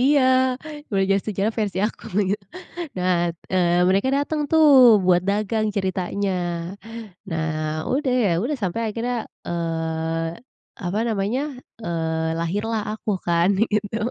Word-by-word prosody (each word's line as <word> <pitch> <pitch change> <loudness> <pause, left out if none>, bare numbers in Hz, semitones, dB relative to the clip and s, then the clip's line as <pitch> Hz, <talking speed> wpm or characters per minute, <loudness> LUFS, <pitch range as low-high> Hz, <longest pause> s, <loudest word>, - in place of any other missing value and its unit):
Iya, 280 +3 +4 0.7
belajar 195 0 +3
sejarah 210 +1 0
versi 205 -4 -1
aku, 225 - -8
begitu. 200 0 0 0.5
Nah, 180 0 +1 0.4
eee, 175 -1 +3
mereka 195 +6 +2
dateng 295 +2 -1
tuh 320 -1 +5 0.4
buat 180 -1 +4
dagang, 215 +2 +1
ceritanya. 190 +1 -1 1.0
Nah, 160 -1 -1 0.4
udah 265 -1 +1
ya 200 - +3
udah 285 +6 -1
sampai 190 +4 -1
akhirnya, 235 +3 -2 0.3
eee, 165 0 -2 0.4
apa 180 +4 -1
namanya, 215 +3 0 0.4
eee, 160 -2 -1
lahirlah 205 +6 -1
aku 215 0 -4 0.2
kan, 170 +1 +3
begitu. 210 -1 0
195 Hz, 120 wpm, -23 LUFS, 170-220 Hz, 1.0 s, tuh